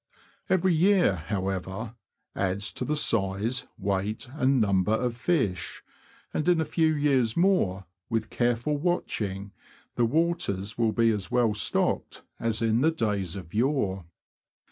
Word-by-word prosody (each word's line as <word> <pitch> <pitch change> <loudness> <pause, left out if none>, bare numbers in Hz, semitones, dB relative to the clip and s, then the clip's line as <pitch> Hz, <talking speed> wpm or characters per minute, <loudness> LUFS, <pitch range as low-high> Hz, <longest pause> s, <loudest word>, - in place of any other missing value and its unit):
Every 185 -1 +3
year, 180 - +4
however, 95 +3 -3 0.4
adds 100 +2 -1
to - - -4
the 150 - 0
size, 110 -2 0
weight, 100 +3 -2
and 135 -2 +2
number 100 -1 +2
of 120 +1 0
fish, 120 - -1 0.5
and 155 +3 0
in 175 -2 +4
a 160 - +1
few^ 160 -3 +1
years 130 -5 +2
more, 170 - +2 0.2
with 110 -2 -2
careful 120 +5 0
watching, 105 - -2 0.5
the 120 - +3
waters 130 - 0
will 115 -2 +1
be 115 +1 +3
as 100 -5 -3
well 120 -3 +2
stocked 105 - 0 0.2
as 115 0 -1
in 115 +1 +2
days 100 - -1
of 90 -4 -9
yore. 105 - 0
115 Hz, 135 wpm, -27 LUFS, 100-145 Hz, 0.5 s, year